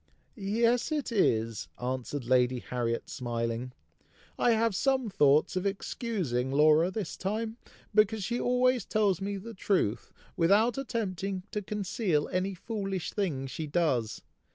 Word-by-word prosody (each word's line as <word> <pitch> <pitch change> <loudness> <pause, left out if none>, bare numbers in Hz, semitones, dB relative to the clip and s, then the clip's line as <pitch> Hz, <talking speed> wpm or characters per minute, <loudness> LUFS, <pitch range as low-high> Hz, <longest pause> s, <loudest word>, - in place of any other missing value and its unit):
"Yes, 230 +5 +1
it 295 -5 -1
is!" 115 - +1
answered 130 +1 -3
Lady 125 0 +3
Harriet, 120 -1 -2
smiling. 120 0 -3 0.6
"I 240 - +3
have 225 -2 +1
some 260 0 +1
thoughts 150 -3 +4
of 185 +2 0
excusing 185 - -2
Laura 155 +4 +5
this 190 -3 -4
time, 220 +4 -3 0.4
because 215 0 +3
she 240 +4 -1
always 250 -1 +2
tells 205 -5 +1
me 200 +1 -2
the 225 +4 -8
truth, 150 - 0 0.2
without 205 +8 +4
attempting 195 -7 -3
to 210 - -2
conceal 195 -5 -1
any 190 +1 -1
foolish 195 -2 -4
thing 160 -10 -1
she 150 +4 -5
does. 135 -9 0
190 Hz, 130 wpm, -29 LUFS, 135-220 Hz, 0.6 s, Laura